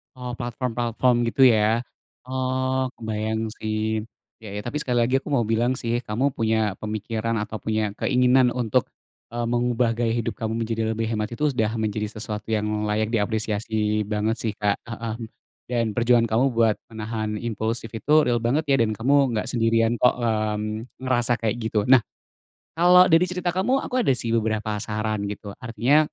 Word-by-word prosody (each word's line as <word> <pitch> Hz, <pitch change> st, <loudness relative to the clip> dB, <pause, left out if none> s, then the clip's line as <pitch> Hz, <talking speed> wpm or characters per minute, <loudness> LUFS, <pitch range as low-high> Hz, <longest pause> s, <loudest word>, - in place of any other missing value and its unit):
Oh 125 Hz, -1 st, -6 dB
platform-platform 120 Hz, 0 st, 0 dB
gitu 115 Hz, -, 0 dB
ya, 110 Hz, +2 st, +2 dB, 0.4 s
oh 130 Hz, 0 st, 0 dB
kebayang 110 Hz, 0 st, -2 dB, 0.2 s
sih, 110 Hz, 0 st, -2 dB, 0.6 s
iya 110 Hz, -, -11 dB
iya 105 Hz, -, -3 dB
tapi 120 Hz, -, -3 dB
sekali 125 Hz, -3 st, 0 dB
lagi 125 Hz, +3 st, +1 dB
aku 145 Hz, -, -10 dB
mau 120 Hz, -, +2 dB
bilang 120 Hz, +3 st, +2 dB
sih 115 Hz, 0 st, -1 dB
kamu 110 Hz, +6 st, 0 dB
punya 110 Hz, 0 st, +1 dB, 0.2 s
pemikiran 110 Hz, +1 st, -2 dB
atau 110 Hz, +1 st, -6 dB
punya 110 Hz, -2 st, 0 dB
keinginan 125 Hz, 0 st, +4 dB
untuk, 120 Hz, 0 st, +2 dB, 0.5 s
eee, 120 Hz, 0 st, -1 dB
mengubah 120 Hz, 0 st, +1 dB
gaya 115 Hz, -1 st, +1 dB
hidup 115 Hz, -, -2 dB
kamu 110 Hz, 0 st, -1 dB
menjadi 115 Hz, 0 st, -2 dB
lebih 110 Hz, 0 st, -2 dB
hemat 105 Hz, -1 st, -1 dB
itu 150 Hz, -, -1 dB
sudah 110 Hz, -4 st, 0 dB
menjadi 105 Hz, -1 st, -1 dB
sesuatu 105 Hz, -1 st, -5 dB
yang 105 Hz, 0 st, -1 dB, 0.2 s
layak 105 Hz, +1 st, 0 dB
diapresiasi 105 Hz, 0 st, 0 dB
banget 105 Hz, +2 st, 0 dB
sih, 110 Hz, -, -1 dB
Kak, 105 Hz, -1 st, +1 dB
heeh, 110 Hz, -1 st, -4 dB, 0.5 s
dan 120 Hz, -2 st, +1 dB
perjuangan 120 Hz, 0 st, +3 dB
kamu 120 Hz, +4 st, +4 dB
buat 115 Hz, -2 st, +3 dB
menahan 110 Hz, -1 st, -4 dB
impulsif 115 Hz, 0 st, -3 dB
itu 125 Hz, +7 st, -1 dB
real 120 Hz, -1 st, +1 dB
banget 135 Hz, +7 st, +1 dB
ya -, -, +6 dB
dan 110 Hz, -2 st, +1 dB
kamu 130 Hz, +5 st, +1 dB, 0.2 s
enggak 105 Hz, -, -2 dB
sendirian 115 Hz, -1 st, +2 dB
kok, 125 Hz, -, +5 dB
mmm, 110 Hz, -1 st, -2 dB, 0.2 s
ngerasa 120 Hz, -2 st, +2 dB
kayak 115 Hz, -1 st, -1 dB
gitu 110 Hz, -1 st, 0 dB
nah, 130 Hz, 0 st, +7 dB, 0.8 s
kalau 180 Hz, +2 st, +7 dB
dari 165 Hz, +2 st, +6 dB
cerita 180 Hz, 0 st, -2 dB
kamu 250 Hz, +9 st, +2 dB
aku 255 Hz, -, -5 dB
ada -, -, +3 dB
sih 115 Hz, -2 st, -2 dB
beberapa 110 Hz, -1 st, -1 dB
saran 110 Hz, -1 st, -2 dB
gitu 100 Hz, 0 st, -6 dB
artinya 125 Hz, +4 st, +2 dB
115 Hz, 170 wpm, -24 LUFS, 110-125 Hz, 0.8 s, nah